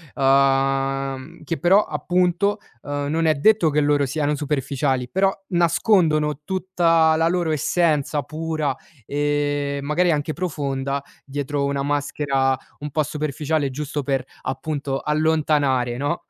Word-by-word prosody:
uhm, 135 +1 +1
che 165 - -2
però 195 +4 +4
appunto, 180 +6 +1 0.2
uhm, 145 0 -3
non 160 +2 0
è 155 - +4
detto 175 +1 +4
che 150 - +1
loro 145 -1 +2
siano 145 +2 -1
superficiali, 140 -3 -1
però, 195 +1 +2 0.2
nascondono 165 - +2
tutta 170 -4 +2
la 165 +1 +2
loro 175 -2 0
essenza 150 -2 +1
pura, 155 -1 -2 0.3
e 145 -1 -1
magari 165 +5 +1
anche 150 0 -1
profonda, 140 -5 -2 0.2
dietro 140 +1 -3
una 140 0 -1
maschera, 140 -2 0 0.2
un 150 0 -6
po' 155 +2 +1
superficiale 150 0 -2
giusto 145 +2 -4
per, 135 -2 -1 0.2
appunto, 135 0 -3
allontanare, 150 -5 +1
no, 145 +6 -2
145 Hz, 125 wpm, -22 LUFS, 140-160 Hz, 0.3 s, però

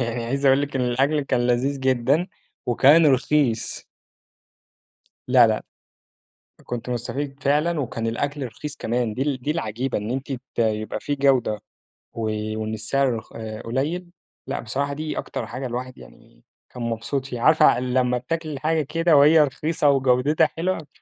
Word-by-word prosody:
يعني 115 -1 -2
عايز 135 +4 -1
اقول 135 +1 +5
لِك 140 -1 -3
إن - - 0
الأكل 135 +5 +1
كان 125 -3 0
لذيذ 135 +3 0
جدًا 130 +6 +2 0.4
وكان 145 +7 +5
رخيص. 135 -3 +1 1.4
لأ، - - +6
لأ - - +1 1.0
أ - - -18
كنت 120 0 -5
مستفيد 135 +3 -4
فعلًا 150 +3 +1
وكان 115 -3 -3
الأكل 140 +4 -2
رخيص 145 +5 -6
كمان 120 -3 -1
دي 130 - -1
ال 135 -3 -2
دي 145 - -1
العجيبة 130 -4 -2
إن 105 +2 -5
أنتِ 135 +2 -3
ت 130 0 -9
يبقى 110 -2 0
في 145 - -2
جودة 135 -6 +2 0.6
و 115 - -5 0.4
وإن 110 0 -3
السعر 125 +5 +1
رخ 110 - -7
آآ، 110 -1 -7
قليل 150 +10 -2 0.4
لأ - - -3
بصراحة 140 +5 -2
دي 155 +2 -4
أكتر 110 - -4
حاجة 130 +4 -6
الواحد 125 +1 -5
يعني - - -17 0.3
كان 125 - -7
مبسوط 115 +4 -2
فيها 125 -3 -6
عارفة 155 -1 +5
أ - - -1
لمّا 125 0 +1
بتاكلي 155 +5 -4
الحاجة 155 +3 0
كده 165 +3 +2
وهي 150 +3 +7
رخيصة 150 +2 0
وجودتها 135 +3 +3
حلوة، 165 0 -3
135 Hz, 165 wpm, -23 LUFS, 120-145 Hz, 1.4 s, وهي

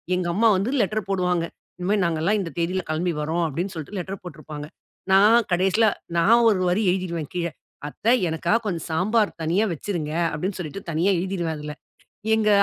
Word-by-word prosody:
எங்க 180 -1 -1
அம்மா 225 +5 +4
வந்து 195 +5 -1
லெட்டர் 210 0 -1
போடுவாங்க. 180 -3 +1 0.3
"இனிமே 185 +3 0
நாங்கலாம் 170 +5 +1
இந்த 180 - -3
தேதியில 180 +2 0
கிளம்பி 170 +3 0
வரோம்" 165 +3 0
அப்படின்னு 175 +6 -3
சொல்லிட்டு 160 +6 -6
லெட்டர் 190 +2 -6
போட்டிருப்பாங்க, 150 -3 -8 0.4
நான் 210 +4 +6
கடைசியில 190 +5 +3 0.3
நான் 230 +8 +5
ஒரு 195 -4 +1
வரி 190 +5 +1
எழுதிடுவேன் 170 -5 -3
கீழ, 170 -1 0 0.4
அத்தை 220 - +1 0.2
எனக்காக 170 +7 +1
கொஞ்சம் 175 -5 -3
சாம்பார் 210 +6 +1
தனியா 175 +7 +2
வச்சுருங்க 160 -2 -4 0.2
அப்படின்னு 180 +6 -3
சொல்லிட்டு 180 +3 -6
தனியா 165 +5 +2
எழுதிருவேன், 175 -4 -2
அதில. 150 0 -6 0.6
எங்க 215 -1 +2
180 Hz, 160 wpm, -24 LUFS, 165-200 Hz, 0.6 s, நான்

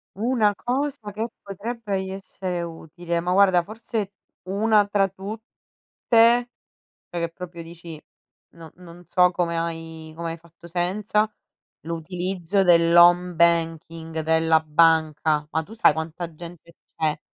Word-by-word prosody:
Una 220 -1 +2
cosa 260 -3 -3
che 225 +3 -3
potrebbe 200 0 -4
i 190 - -6
essere 190 -2 -5
utile, 170 +1 -5
ma, 180 +1 -2
guarda, 190 -2 +4
forse, 215 0 -5 0.4
1 210 +1 +3
tra 200 -1 +2
tutte, 195 +4 -8 1.7
cioè, 175 - -4
che 170 - -1
proprio 170 0 -9
dici: 165 -1 -10 0.5
"No, 165 -1 -13
non 175 0 -14
so 180 -1 +4
come 170 -2 -1
hai 165 -1 -5
come 165 0 -4
hai 165 - -6
fatto 170 +1 -17
senza". 200 +5 0 0.6
L'utilizzo 180 +3 -2
dell'home 175 +1 +5
banking 165 -1 0
della 160 0 +3
banca. 155 -1 +2
Ma 160 0 -1
tu 205 - -13
sai 225 - +5
quanta 165 +2 -5
gente 170 0 -12 0.2
c'è 155 -1 -1
175 Hz, 130 wpm, -23 LUFS, 165-195 Hz, 1.7 s, dell'home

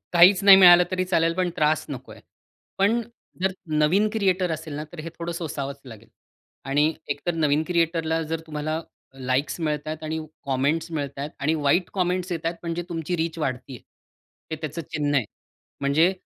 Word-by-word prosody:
काहीच 180 +3 +7
नाही 195 -1 +10
मिळालं 180 -2 +8
तरी 185 0 0
चालेल, 165 -2 +1
पण 180 0 0
त्रास 155 +1 +2
नकोय. 135 -4 -8 0.6
पण 210 +5 +3 0.4
जर 190 0 +2 0.3
नवीन 185 +8 +3
क्रिएटर 190 -4 +1
असेल 155 -1 -6
ना, 150 +1 -4
तर 175 - -11
हे 160 - -6
थोडं 170 0 -3
सोसावंच 140 -4 -5
लागेल. 115 -3 -12 0.6
आणि 145 +4 +2 0.2
एकतर, 145 +4 -2
नवीन 150 -2 +2
क्रिएटरला 165 -2 +1
जर 160 +1 -3
तुम्हाला 155 +1 -3 0.3
लाईक्स 130 +4 -1
मिळत 150 -2 -2
आहेत 155 0 -5
आणि 160 +1 -2 0.3
कॉमेंट्स 140 +5 0
मिळत 140 -3 -4
आहेत 145 +2 -4
आणि 150 +3 +1
वाईट 160 +4 +1
कॉमेंट्स 180 0 0
येत 165 -1 -3
आहेत, 170 +1 -1
म्हणजे 170 0 -3
तुमची 170 0 -3
रीच 165 0 -2
वाढत 135 -5 -1
आहे. 130 -3 -8 0.7
हे 160 - -2
त्याचं 155 +2 -4
चिन्ह 145 -2 0
आहे. 125 - +2 0.6
म्हणजे 150 +6 +3
160 Hz, 175 wpm, -24 LUFS, 145-175 Hz, 0.7 s, नाही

